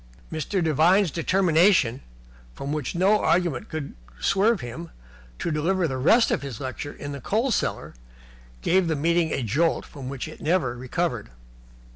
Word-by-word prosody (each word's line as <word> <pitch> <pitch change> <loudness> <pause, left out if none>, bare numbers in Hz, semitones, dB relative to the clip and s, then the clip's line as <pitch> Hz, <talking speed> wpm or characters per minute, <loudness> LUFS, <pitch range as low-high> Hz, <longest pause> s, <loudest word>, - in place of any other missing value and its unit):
Mr. 165 +4 -1
Devine's 165 +4 +3
determination, 170 - +3 0.5
from 140 +2 -4
which 155 +3 -3
no 195 +4 +3
argument 170 -7 +1
could 155 -3 -5 0.3
swerve 205 +2 +2
him, 115 -8 -7 0.5
to 170 - -2
deliver 170 +4 +1
the 130 -3 -3
rest 225 - +4
of - - 0
his 135 -6 -6
lecture 135 +2 -5
in 145 - -7
the 140 -1 -7
coal 230 - 0
cellar - - -2 0.7
gave 185 0 +3
the 160 - 0
meeting 165 +2 +1
a 135 - -1
jolt 150 +10 +1
from 135 -3 -9
which 135 -2 -5
it - - -11
never 155 -7 +1
recovered. 125 - -3
160 Hz, 155 wpm, -25 LUFS, 140-185 Hz, 0.7 s, rest